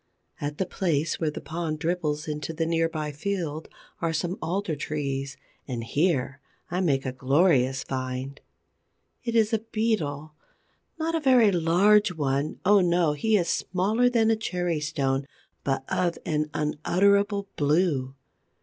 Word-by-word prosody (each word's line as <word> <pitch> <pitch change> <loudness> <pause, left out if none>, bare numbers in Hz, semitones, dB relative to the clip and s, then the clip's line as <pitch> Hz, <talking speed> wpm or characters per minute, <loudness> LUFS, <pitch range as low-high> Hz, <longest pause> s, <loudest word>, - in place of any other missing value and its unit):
At 145 0 -3
the 190 - 0
place 165 -4 -1
where 160 - +1
the 150 - -6
pond 160 -1 -3
dribbles 160 -1 -2
into 150 +1 -4
the 165 +1 -1
near 165 0 +1
by 155 -2 -3
field, 160 -1 -3 0.3
are 165 -1 +1
some 175 +6 -2
alder 180 -1 -1
trees; 140 -2 -3 0.3
and 120 -4 -4
here 135 0 0 0.3
I 180 +1 0
make 140 -7 +1
a 130 - -1
glorious 135 0 +2
find. 130 +1 -4 0.8
It 235 -2 -2
is 220 -1 +3
a 225 - +3
Beetle—not 205 -10 -2 0.8
a 325 - +1
very 255 -7 +5
large 185 +4 +4
one, 145 -1 -1
oh, 205 +1 +6
no! 170 -3 +2
He 215 +9 +2
is 175 -3 0
smaller 210 +7 +1
than 225 -2 +3
a - - +3
cherry 180 -6 -2
stone, 140 -3 -1 0.4
but 135 -1 -1
of 175 -2 0
an 150 -1 0
unutterable 200 +7 +1
blue. 145 -3 +1
160 Hz, 145 wpm, -26 LUFS, 145-190 Hz, 0.8 s, oh